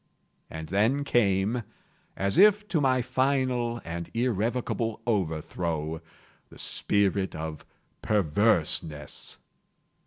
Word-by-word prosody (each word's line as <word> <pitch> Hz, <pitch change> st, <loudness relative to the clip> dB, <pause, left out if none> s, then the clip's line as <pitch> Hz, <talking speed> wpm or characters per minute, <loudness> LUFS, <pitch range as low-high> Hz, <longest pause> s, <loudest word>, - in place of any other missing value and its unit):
And 80 Hz, -1 st, -7 dB
then 110 Hz, +9 st, +2 dB
came, 110 Hz, -2 st, +2 dB, 0.6 s
as 100 Hz, -, +1 dB
if 210 Hz, +1 st, +6 dB
to 160 Hz, -, +1 dB
my 130 Hz, -2 st, +2 dB
final 130 Hz, -3 st, 0 dB
and 85 Hz, 0 st, -5 dB
irrevocable 115 Hz, 0 st, -1 dB
overthrow, 80 Hz, -5 st, -2 dB, 0.5 s
the -, -, -15 dB
spirit 100 Hz, -1 st, 0 dB
of 80 Hz, -1 st, -5 dB, 0.4 s
PERVERSENESS. 85 Hz, -6 st, +1 dB
105 Hz, 90 wpm, -27 LUFS, 85-125 Hz, 0.6 s, if